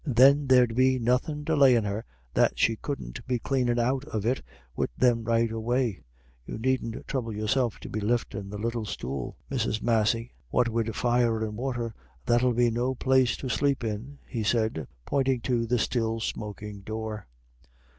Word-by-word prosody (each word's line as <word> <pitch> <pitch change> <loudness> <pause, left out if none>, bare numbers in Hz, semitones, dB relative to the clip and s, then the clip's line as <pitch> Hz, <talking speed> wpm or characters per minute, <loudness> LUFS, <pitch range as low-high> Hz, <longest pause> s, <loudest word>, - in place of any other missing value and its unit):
Then 140 +1 +5
there'd 125 -3 +5
be 130 +2 +3
nothin' 125 +5 0
delayin' 140 -7 +5
her 105 +2 -3 0.3
that - - +3
she 115 - +3
couldn't 110 - -6
be 125 -1 +1
cleanin' 125 -1 0
out 130 +3 +1
of 110 -8 -3
it 125 +3 +1 0.3
wid - - 0
them 120 -2 +3
right 115 0 +2
away 115 -1 -1 0.4
You - - -6
needn't 120 -1 -1
throuble 115 -5 -3
yourself 110 +2 0
to - - -7
be 110 - -3
liftin' 105 -2 -1
the 105 - -5
little 115 +1 -2
stool, 70 -10 -5
Mrs. 115 -5 0
Massey. 115 0 +1 0.2
What 125 -2 +2
wid 115 -1 -1
fire 120 -2 +2
and 105 -1 -5
water, 120 -1 -3 0.3
that'll 120 +1 +3
be 120 0 +3
no 125 +3 0
place 130 -2 +3
to 135 - -5
sleep 140 -1 +1
in," 115 +6 -4
he 115 - -4
said, 110 - 0 0.2
pointing 135 -2 +1
to 120 -2 0
the 125 +2 +2
still 115 -1 0
smoking 105 -1 -5
door. 110 -1 -5
115 Hz, 165 wpm, -27 LUFS, 110-130 Hz, 0.4 s, Then